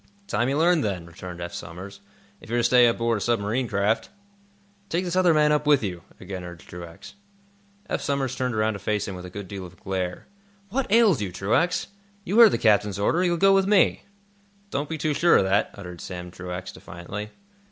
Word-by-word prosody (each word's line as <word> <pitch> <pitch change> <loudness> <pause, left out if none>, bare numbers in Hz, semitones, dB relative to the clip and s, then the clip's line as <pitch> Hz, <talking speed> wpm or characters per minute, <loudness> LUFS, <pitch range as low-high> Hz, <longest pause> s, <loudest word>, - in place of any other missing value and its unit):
"Time 120 -9 0
you 140 - 0
learned, 170 0 +3
then," 95 -5 -2
returned 85 +1 -9
Eph 85 0 -6
Somers, 95 +5 -8 0.4
"if - - -15
you're 120 - 0
to 120 - +2
stay 125 0 +6
aboard 115 -1 +1
a - - -9
submarine 115 +3 0
craft." 105 - 0 0.8
"Take 175 +3 -1
this 175 0 -2
other 185 -2 +4
man 150 -1 +4
up 150 0 +1
with 145 -5 +4
you," 90 -4 -4 0.2
again 95 -1 -7
urged 85 -2 -10
Truax. 85 - -10 0.7
Eph - - -2
Somers 135 -2 -1
turned 125 -2 -2
around 110 0 +1
to 100 - -7
face 105 0 -1
him 100 - -5
with 90 0 -8
a - - -10
good 100 +1 -8
deal 95 0 -7
of 90 - -10
a - - -25
glare. 95 -2 -3 0.4
"What 250 0 -2
ails 215 - +5
you, 100 -3 -3
Truax? 115 - +1 0.4
You 205 +4 +1
heard 230 -2 +10
the - - +1
captain's 105 -3 +2
order. 165 - +1
You'll 175 -1 +1
go 195 +3 +5
with 195 0 +3
me." 205 -2 +4 0.7
"Don't 140 +1 -2
be 160 - -3
too 155 0 0
sure 170 +4 +5
of - - +3
that," 95 +2 +2
uttered 90 -4 -9
Sam 90 -1 -7
Truax, 90 0 -6
defiantly. 100 +5 -8
105 Hz, 210 wpm, -25 LUFS, 90-150 Hz, 0.8 s, heard